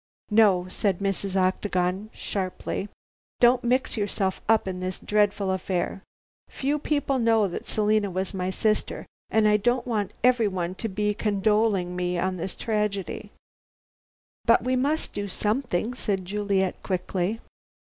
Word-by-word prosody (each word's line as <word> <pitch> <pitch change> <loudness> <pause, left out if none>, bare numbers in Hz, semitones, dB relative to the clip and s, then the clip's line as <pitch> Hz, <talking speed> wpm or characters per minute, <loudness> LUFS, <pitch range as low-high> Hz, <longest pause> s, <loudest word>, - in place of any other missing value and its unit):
"No," 205 -5 +5
said 190 0 0
Mrs. 195 0 -2
Octagon 185 +1 0
sharply, 190 +1 -3 0.5
"don't 245 +1 +5
mix 250 +2 +1
yourself 200 -3 -1
up 225 -3 +4
in 185 -1 -3
this 185 0 -3
dreadful 205 -2 +1
affair. 190 0 -2 0.5
Few 285 +2 -1
people 285 -3 0
know 225 -3 +3
that 175 - -6
Selina 215 -1 +2
was 190 +1 -2
my 185 -1 -2
sister, 215 +3 -1 0.2
and 220 -1 +3
I 210 0 +5
don't 240 +3 +1
want 215 -5 -1
everyone 205 -8 +2
to 225 +4 -4
be 210 +2 0
condoling 210 -2 +1
with 180 - -6
me 180 0 -1
on 185 +1 -1
this 180 +2 -4
tragedy." 210 -4 -2 1.2
"But - - +5
we 255 +1 +1
must 290 +5 0
do 205 0 -3
something," 220 +1 -1
said 200 -6 -2
Juliet 195 -1 0
quickly. 185 +2 -1
205 Hz, 140 wpm, -26 LUFS, 185-220 Hz, 1.2 s, No